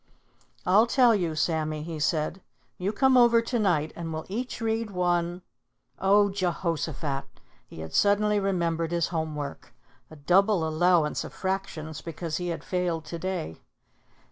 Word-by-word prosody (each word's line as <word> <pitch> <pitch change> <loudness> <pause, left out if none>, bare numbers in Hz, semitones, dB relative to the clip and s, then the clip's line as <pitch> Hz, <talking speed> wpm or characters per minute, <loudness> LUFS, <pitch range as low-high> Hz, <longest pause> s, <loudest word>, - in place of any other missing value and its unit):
"I'll 210 +5 +5
tell 245 -1 +5
you, 175 -6 0
Sammy," 155 -1 -1
he 160 -1 -6
said. 155 +4 0 0.4
"You 190 +3 -1
come 265 +3 +3
over 235 -1 +6
to 230 +1 -1
night, 160 -7 +1
and 165 -1 -5
we'll 160 0 -4
each 245 +6 -4
read 225 -1 -1
one 175 -1 0 0.6
oh 200 +1 +4
Jehoshaphat!" 165 -6 -2 0.4
He 80 - -10
had 80 0 -8
suddenly 205 +1 +3
remembered 170 -4 0
his 170 -1 0
home 160 -3 -2
work, 140 -4 -7 0.3
a 155 - -12
double 180 +3 +3
allowance 160 -1 +2
of - - -9
fractions 180 -5 -4
because 165 -1 -4
he 180 - -3
had 165 -3 -4
failed 175 -3 -2
to 170 +2 -6
day. 180 - -4
175 Hz, 150 wpm, -27 LUFS, 160-200 Hz, 0.6 s, over